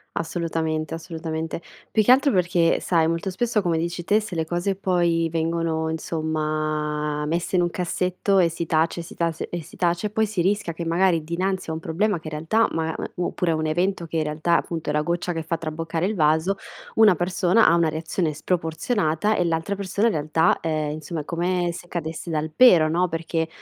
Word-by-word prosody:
Assolutamente, 160 -1 -2
assolutamente. 165 -1 -4 0.3
Più 215 - +3
che 245 - +5
altro 275 +2 +5
perché, 175 -3 +2
sai 165 -3 +2
molto 165 +3 -1
spesso 230 0 0
come 170 -3 +1
dici 170 +1 -3
te, 205 +6 +3
se 210 -5 -6
le 160 -1 0
cose 175 +4 -1
poi 175 -3 +1
vengono 165 -1 -1
insomma 155 -2 -2
messe 170 +4 -1
in 175 - +4
un 175 - 0
cassetto 180 +2 0
e 175 -2 +5
si 170 0 -4
tace 160 +2 +1
e - - -4
si 165 - -11
tase 165 -2 -2
e 175 -1 -4
si 155 - -14
tace 175 +4 0
poi 220 0 +1
si 200 -4 -1
rischia 190 -3 0
che 170 +1 -5
magari 170 -1 +2
dinanzi 180 +1 -2
a - - -2
un 160 - -4
problema 175 +4 0
che 160 - -10
in 155 - -6
realtà 165 +9 +2
ma 160 0 -1
m - - -5
mu 180 - -1
oppure 175 -2 -1
a - - +1
un 155 0 -1
evento 175 +3 0
che 165 0 -4
in 155 - +2
realtà 155 +3 0
appunto 165 -2 -3
è - - -3
la 150 - +2
goccia 175 +2 -1
che 165 - -3
fa 165 +1 -2
traboccare 165 +1 -3
il 205 - 0
vaso 160 +2 +2 0.4
una 215 -4 +6
persona 180 +5 +3
ha 170 - +6
una 170 -2 +3
reazione 160 +1 -2
sproporzionata 165 +3 0
e - - +2
l'altra 165 +4 -1
persona 200 +3 0
in 225 - +1
realtà, 155 +2 +2
ehm, 155 -2 -1
insomma 155 +1 -5
è - - -12
come 175 +1 0
se 175 - -9
cadesse 165 0 -5
dal 155 -1 -2
pero, 180 -11 +7
no, 175 +3 +1
perché 165 0 -2
165 Hz, 210 wpm, -24 LUFS, 160-180 Hz, 0.4 s, pero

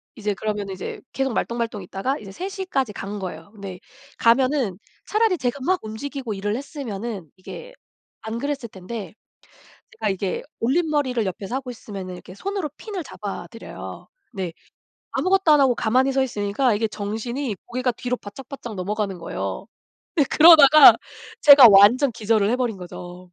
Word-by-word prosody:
이제 210 -2 -2
그러면은 205 -2 -3
이제 185 - -6
계속 270 -1 -1
말똥말똥 230 -4 -2
있다가 195 +10 -3
이제 195 -3 -10
3:00 385 - -5
까지 265 - -1
간 200 +2 -6
거예요. 175 -1 -7
근데 195 -3 -8 0.4
가면은 245 -4 +2 0.3
차라리 430 -4 +2
제가 260 +1 -2
막 370 0 +2
움직이고 250 +1 -5
일을 205 +2 -2
했으면은 230 - -6
이게 485 - -10 0.5
안 220 +1 -5
그랬을 280 -3 -3
텐데 195 0 -8 0.9
제가 - - 0
이게 190 -1 -2 0.2
올림머리를 275 -3 +1
옆에서 195 +5 -4
하고 260 -2 -4
있으면은 195 -5 -8
이렇게 185 +1 -12
손으로 390 - -3
핀을 400 -5 -6
잡아 205 -6 -7
드려요. 230 - -9 0.3
네. 185 -4 -4 0.6
아무것도 370 -3 +2
안 295 - +6
하고 255 -3 +4
가만히 255 +5 +2
서 265 0 +2
있으니까 215 +1 0
이게 220 +1 0
정신이 220 +4 -4
고개가 250 +1 -1
뒤로 250 +2 -3
바짝바짝 240 +2 -9
넘어가는 195 0 -3
거예요. - - -5 0.5
근데 290 -5 +3
그러다가 305 -2 +9 0.5
제가 280 -4 +10
완전 220 +7 +6
기절을 215 -2 +1
해 - - +2
버린 235 -6 -1
거죠. 180 0 -9
230 Hz, 360 characters per minute, -23 LUFS, 200-275 Hz, 0.9 s, 제가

